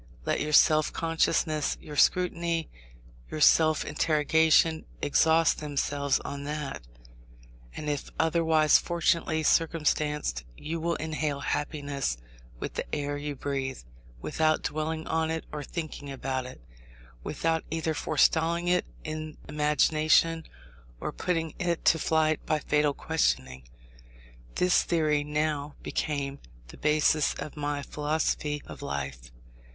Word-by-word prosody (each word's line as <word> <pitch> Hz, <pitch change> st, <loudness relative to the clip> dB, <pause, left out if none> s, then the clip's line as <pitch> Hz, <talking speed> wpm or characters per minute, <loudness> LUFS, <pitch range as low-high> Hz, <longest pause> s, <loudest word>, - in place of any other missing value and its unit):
Let -, -, 0 dB
your 150 Hz, -, -2 dB
self 155 Hz, 0 st, +5 dB
consciousness, 160 Hz, -2 st, 0 dB
your 150 Hz, -, -9 dB
scrutiny, 170 Hz, -1 st, +1 dB, 0.6 s
your 155 Hz, -, -5 dB
self 155 Hz, 0 st, +5 dB
interrogation, 160 Hz, +1 st, +3 dB
exhaust 160 Hz, +2 st, +3 dB
themselves 140 Hz, -2 st, 0 dB
on 140 Hz, 0 st, -6 dB
that; 150 Hz, -, -4 dB, 0.9 s
and 150 Hz, -, -6 dB
if 145 Hz, -2 st, -2 dB
otherwise 160 Hz, -2 st, +4 dB
fortunately 170 Hz, -2 st, 0 dB
circumstanced 150 Hz, -, +1 dB
you 165 Hz, +2 st, -4 dB
will 170 Hz, +1 st, 0 dB
inhale 155 Hz, -2 st, -2 dB
happiness 145 Hz, -, -2 dB, 0.4 s
with -, -, -5 dB
the -, -, -3 dB
air 145 Hz, -1 st, -2 dB
you 145 Hz, 0 st, -4 dB
breathe, 135 Hz, -1 st, -3 dB, 0.4 s
without 155 Hz, -, +1 dB
dwelling 155 Hz, +1 st, -2 dB
on 160 Hz, 0 st, 0 dB
it 160 Hz, 0 st, -3 dB
or 150 Hz, -1 st, -5 dB
thinking 155 Hz, -2 st, -6 dB
about 130 Hz, -1 st, -3 dB
it, 130 Hz, -, -11 dB, 0.6 s
without 165 Hz, -1 st, -1 dB
either 160 Hz, 0 st, -1 dB
forestalling 165 Hz, +3 st, +2 dB
it 180 Hz, 0 st, +2 dB, 0.2 s
in 155 Hz, 0 st, -6 dB
imagination, 155 Hz, +2 st, +2 dB, 0.5 s
or -, -, -3 dB
putting 165 Hz, -3 st, -2 dB
it 175 Hz, -3 st, -1 dB
to 160 Hz, -, +5 dB
flight 155 Hz, 0 st, +1 dB
by 155 Hz, -, +1 dB
fatal 150 Hz, -1 st, +1 dB
questioning. 65 Hz, +1 st, -1 dB, 0.9 s
This 180 Hz, 0 st, +3 dB
theory 155 Hz, -3 st, +1 dB
now 150 Hz, -1 st, -2 dB
became 140 Hz, -2 st, -2 dB, 0.3 s
the -, -, -12 dB
basis 150 Hz, 0 st, +2 dB
of 150 Hz, -, -7 dB
my 145 Hz, -1 st, -2 dB
philosophy 150 Hz, 0 st, -1 dB
of -, -, -10 dB
life. 70 Hz, -3 st, -5 dB
155 Hz, 120 wpm, -28 LUFS, 145-160 Hz, 0.9 s, self